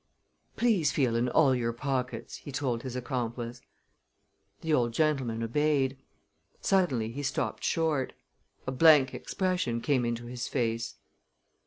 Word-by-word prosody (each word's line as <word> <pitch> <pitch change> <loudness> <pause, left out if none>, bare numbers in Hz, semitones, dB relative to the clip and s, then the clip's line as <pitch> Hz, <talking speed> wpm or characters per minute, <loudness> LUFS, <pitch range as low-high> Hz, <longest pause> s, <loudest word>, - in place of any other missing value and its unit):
"Please 205 -11 +2
feel 125 -5 +1
in 120 +2 +1
all 140 0 +4
your 120 -2 0
pockets," 130 +1 -3
he 145 - -9
told 130 -4 -1
his 130 0 -6
accomplice. 120 -1 -3 1.0
The 160 -1 0
old 120 -4 +2
gentleman 135 -7 +1
obeyed. 135 +2 +1 0.6
Suddenly 135 - +1
he 140 +4 -5
stopped 140 - -2
short. 155 -5 0 0.5
A 130 - -2
blank 145 -1 +6
expression 180 -11 -1
came 130 0 +1
into 120 0 -2
his 120 +1 -5
face. 115 -2 -1
130 Hz, 130 wpm, -29 LUFS, 120-150 Hz, 1.0 s, blank